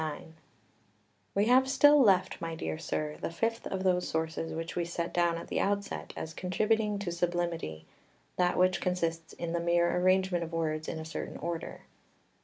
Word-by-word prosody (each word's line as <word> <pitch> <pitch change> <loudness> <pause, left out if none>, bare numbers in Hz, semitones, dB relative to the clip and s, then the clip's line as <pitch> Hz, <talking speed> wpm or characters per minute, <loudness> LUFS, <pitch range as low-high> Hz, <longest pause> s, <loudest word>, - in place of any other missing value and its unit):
XXXIX 155 -2 -3 1.1
We 200 +1 +3
have 260 +3 +5
still 290 +1 +6
left, 190 -7 +3
my 165 -1 -3
dear 160 - -4
sir, 155 -2 -3
the - - -2
fifth 225 +7 -2
of 190 -1 -3
those 180 -1 +2
sources 160 0 -2
which 165 +1 -5
we 175 - 0
set 170 0 -3
down 170 -1 +2
at 170 - -7
the - - -1
outset 200 0 -1
as 160 - -5
contributing 210 +4 0
to 200 -3 -3
sublimity, 170 - -2 0.5
that 180 -1 +2
which 185 -1 +3
consists 165 -3 -1
in 170 -1 -4
the 170 - +1
mere 170 0 +2
arrangement 185 -1 +2
of 165 0 -7
words 155 -1 -1
in 160 - -3
a 160 - -6
certain 160 - -5
order. 170 0 -5
175 Hz, 180 wpm, -30 LUFS, 165-190 Hz, 1.1 s, still